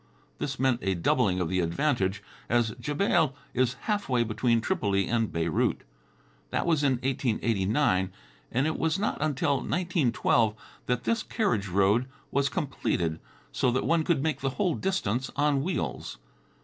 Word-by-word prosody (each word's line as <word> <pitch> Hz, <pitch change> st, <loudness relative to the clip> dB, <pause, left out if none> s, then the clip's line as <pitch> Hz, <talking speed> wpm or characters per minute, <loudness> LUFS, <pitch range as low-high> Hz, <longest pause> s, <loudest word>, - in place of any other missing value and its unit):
This 135 Hz, -2 st, -3 dB
meant 130 Hz, -2 st, +2 dB
a 95 Hz, -1 st, 0 dB
doubling 95 Hz, +2 st, +2 dB
of 90 Hz, -, 0 dB
the 95 Hz, +3 st, 0 dB
advantage, 95 Hz, -, 0 dB, 0.3 s
as 120 Hz, -1 st, +2 dB
Jebail 150 Hz, 0 st, +1 dB, 0.2 s
is 125 Hz, 0 st, +1 dB
halfway 200 Hz, -, 0 dB
between 115 Hz, +1 st, +1 dB
Tripoli 100 Hz, -, 0 dB
and 115 Hz, -2 st, 0 dB
Beirut. 85 Hz, -1 st, 0 dB, 0.7 s
That -, -, -1 dB
was 160 Hz, -4 st, +2 dB
in 135 Hz, -2 st, +4 dB
1889 115 Hz, -5 st, +1 dB, 0.4 s
and 125 Hz, +4 st, +1 dB
it 155 Hz, -, -1 dB
was 160 Hz, +2 st, +1 dB
not 210 Hz, +2 st, -1 dB
until 145 Hz, -2 st, +1 dB
1912 130 Hz, -, +1 dB, 0.3 s
that 125 Hz, -1 st, 0 dB
this 230 Hz, -1 st, +1 dB
carriage 195 Hz, -, 0 dB
road 100 Hz, +6 st, +2 dB, 0.2 s
was 140 Hz, 0 st, +2 dB
completed, 110 Hz, -, -1 dB, 0.3 s
so -, -, +1 dB
that 130 Hz, +2 st, 0 dB
one 165 Hz, -1 st, +2 dB
could 155 Hz, -4 st, +1 dB
make 155 Hz, -4 st, -1 dB
the 135 Hz, -, 0 dB
whole 185 Hz, -5 st, +2 dB
distance 135 Hz, -, -1 dB
on 145 Hz, -1 st, +2 dB
wheels. 135 Hz, -, -3 dB
130 Hz, 150 wpm, -28 LUFS, 105-150 Hz, 0.7 s, in